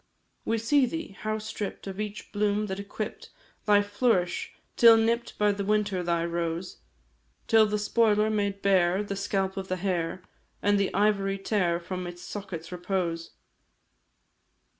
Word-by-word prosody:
We 225 Hz, -, +1 dB
see 255 Hz, +4 st, +3 dB
thee 325 Hz, +6 st, -4 dB
how 215 Hz, 0 st, -2 dB
stripp'd 215 Hz, -2 st, -5 dB
of 195 Hz, +1 st, -6 dB
each 210 Hz, -1 st, -6 dB
bloom 205 Hz, 0 st, +1 dB
that 190 Hz, -1 st, -4 dB
equipp'd 200 Hz, +2 st, -6 dB, 0.4 s
Thy 205 Hz, -1 st, +5 dB
flourish, 205 Hz, -3 st, 0 dB, 0.2 s
till 230 Hz, -1 st, +8 dB
nipp'd 230 Hz, +1 st, 0 dB
the 205 Hz, -1 st, +1 dB
winter 205 Hz, -2 st, +1 dB
thy 170 Hz, -1 st, 0 dB
rose; 170 Hz, +1 st, -3 dB, 0.7 s
Till 220 Hz, -1 st, +5 dB
the 210 Hz, 0 st, 0 dB
spoiler 215 Hz, 0 st, +2 dB
made 200 Hz, -2 st, -1 dB
bare 190 Hz, 0 st, +3 dB
the 200 Hz, -1 st, -4 dB
scalp 195 Hz, 0 st, -1 dB
of 190 Hz, -1 st, -4 dB
the 185 Hz, -, -1 dB
hair, 180 Hz, -1 st, -2 dB, 0.4 s
And 205 Hz, 0 st, +2 dB
the 195 Hz, -, +1 dB
ivory 195 Hz, -1 st, +2 dB
tare 190 Hz, -4 st, 0 dB
from 180 Hz, +1 st, -5 dB
its 175 Hz, 0 st, -9 dB
sockets' 185 Hz, -5 st, -7 dB
repose. 175 Hz, -2 st, -3 dB
200 Hz, 145 wpm, -27 LUFS, 185-210 Hz, 0.7 s, till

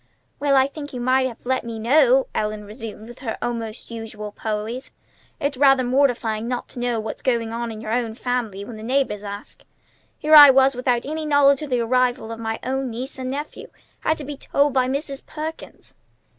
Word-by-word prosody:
"Well, 285 Hz, -1 st, +2 dB
I 265 Hz, -1 st, +5 dB
think 285 Hz, +1 st, -8 dB
you 250 Hz, -, -4 dB
might 260 Hz, +1 st, +2 dB
have 235 Hz, -2 st, -10 dB
let 260 Hz, +1 st, 0 dB
me 230 Hz, -1 st, -6 dB
know," 315 Hz, -, +4 dB
Ellen 210 Hz, 0 st, -2 dB
resumed 215 Hz, 0 st, -9 dB
with 240 Hz, +2 st, -12 dB, 0.2 s
almost 230 Hz, -2 st, -4 dB
her -, -, -9 dB
usual 215 Hz, -2 st, -7 dB
poise. 220 Hz, +4 st, -4 dB, 0.5 s
"It's 285 Hz, -1 st, -1 dB
rather 270 Hz, -1 st, +5 dB
mortifying 245 Hz, -4 st, +1 dB
not 245 Hz, 0 st, -3 dB
to -, -, -9 dB
know 240 Hz, -2 st, 0 dB
what's 220 Hz, 0 st, -5 dB
going 230 Hz, -3 st, 0 dB
on 235 Hz, 0 st, -3 dB
in 215 Hz, -1 st, -8 dB
your 220 Hz, -1 st, -5 dB
own 230 Hz, -2 st, -1 dB
family 230 Hz, -6 st, -3 dB
when 225 Hz, -1 st, -9 dB
the -, -, -9 dB
neighbors 250 Hz, -3 st, 0 dB
ask. 205 Hz, 0 st, -8 dB, 0.6 s
Here 305 Hz, +1 st, 0 dB, 0.2 s
was 270 Hz, +1 st, +4 dB
I -, -, -12 dB
without 250 Hz, -1 st, 0 dB
any 310 Hz, +2 st, -3 dB
knowledge 280 Hz, -1 st, +4 dB
of 300 Hz, -, -5 dB
the 250 Hz, -2 st, +1 dB
arrival 245 Hz, -1 st, +1 dB
of 230 Hz, -, -6 dB
my 225 Hz, 0 st, -3 dB
own 265 Hz, 0 st, -2 dB
niece 255 Hz, +4 st, -6 dB
and 255 Hz, 0 st, -3 dB
nephew! 290 Hz, +3 st, -6 dB, 0.3 s
Had 315 Hz, -, 0 dB
to 300 Hz, -, -6 dB
be 290 Hz, 0 st, -6 dB
told 285 Hz, 0 st, +1 dB
by 255 Hz, -1 st, +2 dB
Mrs. 275 Hz, +1 st, -3 dB
Perkins." 315 Hz, +1 st, -8 dB
250 Hz, 200 wpm, -22 LUFS, 225-275 Hz, 0.6 s, I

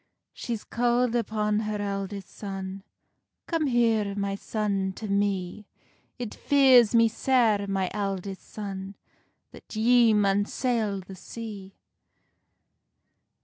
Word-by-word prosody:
She's 230 Hz, -3 st, -4 dB
calld 240 Hz, 0 st, +1 dB
upon 210 Hz, -2 st, 0 dB
her 215 Hz, -1 st, -3 dB
eldest 200 Hz, -1 st, -4 dB
son: 195 Hz, -1 st, -6 dB, 0.6 s
"Come 325 Hz, -3 st, 0 dB
here, 225 Hz, -5 st, +2 dB
my 200 Hz, -1 st, -1 dB
son, 200 Hz, -2 st, -2 dB
to 215 Hz, -, -7 dB
me; 200 Hz, -1 st, -1 dB, 0.5 s
It 240 Hz, -4 st, -5 dB
fears 260 Hz, -5 st, +5 dB
me 230 Hz, 0 st, +6 dB
sair, 225 Hz, -3 st, +2 dB
my 195 Hz, -1 st, 0 dB
eldest 195 Hz, -2 st, -4 dB
son, 195 Hz, -2 st, -6 dB, 0.6 s
That -, -, -12 dB
ye 230 Hz, 0 st, +5 dB
maun 205 Hz, 0 st, +2 dB
sail 220 Hz, -5 st, -1 dB
the 190 Hz, +1 st, -11 dB
sea." 200 Hz, 0 st, -9 dB
210 Hz, 110 wpm, -27 LUFS, 195-230 Hz, 0.6 s, me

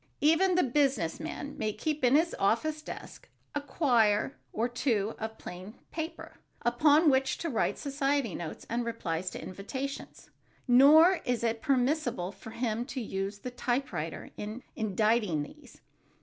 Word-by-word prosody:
Even 335 Hz, +5 st, +4 dB
the 360 Hz, -, +4 dB
business 260 Hz, -, +1 dB
man 300 Hz, -3 st, -6 dB
may 215 Hz, -, 0 dB
keep 300 Hz, +7 st, -3 dB
in 250 Hz, +2 st, +5 dB
his 330 Hz, +3 st, +3 dB
office 300 Hz, +10 st, +1 dB
desk -, -, -9 dB, 0.2 s
a 290 Hz, -, -1 dB
quire 245 Hz, -5 st, +2 dB, 0.2 s
or 230 Hz, +2 st, 0 dB
two 230 Hz, -4 st, 0 dB
of 220 Hz, 0 st, -5 dB
plain 185 Hz, +5 st, -9 dB, 0.2 s
paper 320 Hz, 0 st, -6 dB, 0.3 s
upon 295 Hz, +7 st, +4 dB
which 265 Hz, 0 st, +1 dB
to 335 Hz, -, -3 dB
write 230 Hz, -, 0 dB
society 275 Hz, -, 0 dB
notes 170 Hz, -2 st, -6 dB
and 235 Hz, +1 st, -1 dB
replies 185 Hz, -7 st, -3 dB
to -, -, -7 dB
invitations. 260 Hz, +9 st, -6 dB, 0.4 s
Nor 310 Hz, +8 st, +7 dB
is 245 Hz, -2 st, -1 dB
it 230 Hz, -1 st, 0 dB
permissible 255 Hz, -, +1 dB
for 220 Hz, -, -11 dB
him 230 Hz, 0 st, -2 dB
to 265 Hz, -, -5 dB
use 195 Hz, -3 st, -3 dB
the 250 Hz, +5 st, -7 dB
typewriter 240 Hz, -, -3 dB
in 215 Hz, +4 st, -6 dB
inditing 215 Hz, -5 st, +1 dB
these. 145 Hz, -, -14 dB
245 Hz, 150 wpm, -30 LUFS, 215-285 Hz, 0.4 s, Nor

